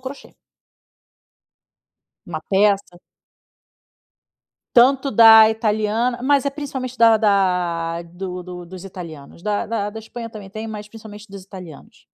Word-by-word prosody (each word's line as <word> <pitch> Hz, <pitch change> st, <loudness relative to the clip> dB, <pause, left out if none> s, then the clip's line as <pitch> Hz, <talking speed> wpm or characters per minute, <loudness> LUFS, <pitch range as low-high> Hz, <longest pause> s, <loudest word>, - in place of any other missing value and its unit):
crochê. 265 Hz, +2 st, -10 dB, 1.9 s
Uma 160 Hz, -3 st, -5 dB
peça 200 Hz, -2 st, +1 dB, 1.8 s
Tanto 265 Hz, +3 st, +4 dB
da 220 Hz, -1 st, +8 dB
italiana 220 Hz, +2 st, -1 dB
mas 280 Hz, +1 st, +2 dB
é -, -, +1 dB
principalmente 265 Hz, -3 st, -6 dB
da 225 Hz, -2 st, +5 dB
da 180 Hz, -5 st, 0 dB
do 180 Hz, +1 st, -7 dB
do 180 Hz, 0 st, -9 dB
dos 185 Hz, +1 st, -11 dB
italianos. 170 Hz, -4 st, -11 dB
Da 210 Hz, -1 st, -2 dB
da 210 Hz, -2 st, -3 dB
da 220 Hz, -, -8 dB
Espanha 230 Hz, +1 st, -8 dB
também 205 Hz, -3 st, -10 dB
tem, 215 Hz, +3 st, -7 dB
mas 210 Hz, -1 st, -8 dB
principalmente 210 Hz, -1 st, -12 dB
dos 195 Hz, -1 st, -10 dB
italianos. 180 Hz, -6 st, -13 dB
210 Hz, 125 wpm, -20 LUFS, 180-230 Hz, 1.9 s, da